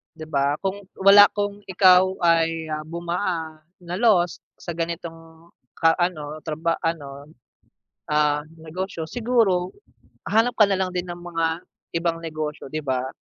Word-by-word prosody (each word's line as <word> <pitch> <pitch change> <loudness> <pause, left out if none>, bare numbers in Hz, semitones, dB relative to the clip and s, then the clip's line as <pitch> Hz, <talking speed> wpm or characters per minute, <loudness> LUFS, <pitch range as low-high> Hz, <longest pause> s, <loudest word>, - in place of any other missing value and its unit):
'di 155 -1 -9
ba? 140 0 0
Kung 195 +1 -3 0.2
wala 200 +1 +8
kung 205 0 -3
ikaw 185 -1 +6 0.2
ay 165 -1 +2 0.2
bumaa 170 -1 -4 0.2
na 175 0 -6
lost 185 -6 +2 0.2
sa 170 - -6
ganitong 165 -1 -6 0.2
ka 165 -1 +3
ano, 155 -4 -3
traba 165 +1 -1
ano, 145 -3 -4 0.8
ah, 150 -1 +2 0.2
negosyo, 165 +1 -5
siguro 220 -5 +1 0.6
hanap 225 +3 +3
ka 210 -2 +4
nalang 190 -1 0
din 180 0 -3
ng 175 - -5
mga 165 -1 -2 0.3
ibang 165 0 -1
negosyo, 155 -3 -5
'di 155 -1 -5
ba? 130 0 -1
170 Hz, 130 wpm, -23 LUFS, 155-185 Hz, 0.8 s, wala